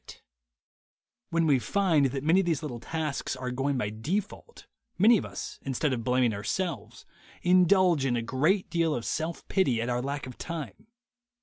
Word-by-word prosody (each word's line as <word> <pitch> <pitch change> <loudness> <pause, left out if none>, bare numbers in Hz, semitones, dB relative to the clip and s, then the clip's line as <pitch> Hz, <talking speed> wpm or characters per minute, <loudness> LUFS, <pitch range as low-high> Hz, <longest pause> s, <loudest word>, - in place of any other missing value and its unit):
t - - -11 1.1
When 165 0 +1
we 140 -4 +4
find 155 - +2
that 135 +1 -4
many 165 +5 +4
of 190 - 0
these 160 -4 0
little 125 -6 -5
tasks 155 0 -3
are 130 -1 -4
going 135 +2 -1
by 105 -5 -2
default, 190 - -4 0.3
many 220 +3 +6
of - - -6
us, - - -7
instead 135 +1 -1
of 115 -2 -3
blaming 125 -1 +2
ourselves, 165 - -4 0.4
indulge 180 -3 +4
in 130 -3 +1
a 115 - -1
great 155 - +1
deal 165 -3 +1
of 120 - -4
self 160 +1 -3
pity 155 -12 +1
at 115 +2 -2
our 120 0 0
lack 140 +2 -4
of 125 -1 -10
time. 170 +6 -6
145 Hz, 180 wpm, -28 LUFS, 125-175 Hz, 1.1 s, many